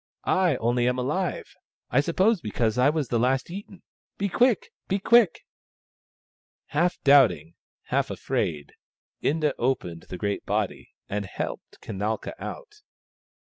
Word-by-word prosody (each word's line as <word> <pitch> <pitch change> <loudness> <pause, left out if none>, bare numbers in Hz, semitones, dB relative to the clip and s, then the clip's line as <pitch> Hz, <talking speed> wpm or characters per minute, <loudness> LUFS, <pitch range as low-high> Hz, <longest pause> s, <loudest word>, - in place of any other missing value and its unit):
I 180 -6 +3
only 120 +1 +1
am 125 0 +1
alive, 155 +9 -2 0.4
I 125 - +4
sup 170 +3 -4
pose 205 0 +3
because 110 +2 -1
I 130 +3 +5
was 150 -5 -1
the 120 - +1
last 130 +5 +1
eaten. 195 0 -9 0.3
Be 200 0 -1
quick! 240 +1 +2 0.2
be 195 - +1
quick! 225 -2 +4 0.6
" - - -92
Half 175 +4 +1
doubting, 110 - +5 0.3
half - - 0
afraid, 75 -3 -2 0.5
Inda 150 -1 +1
opened 110 -10 -1
the 90 - -5
great 100 +2 -2
body, - - -2 0.2
and 100 0 -3
helped - - -6
Kanalka 105 +3 -3
out. 425 -4 -8
135 Hz, 135 wpm, -26 LUFS, 110-185 Hz, 0.6 s, I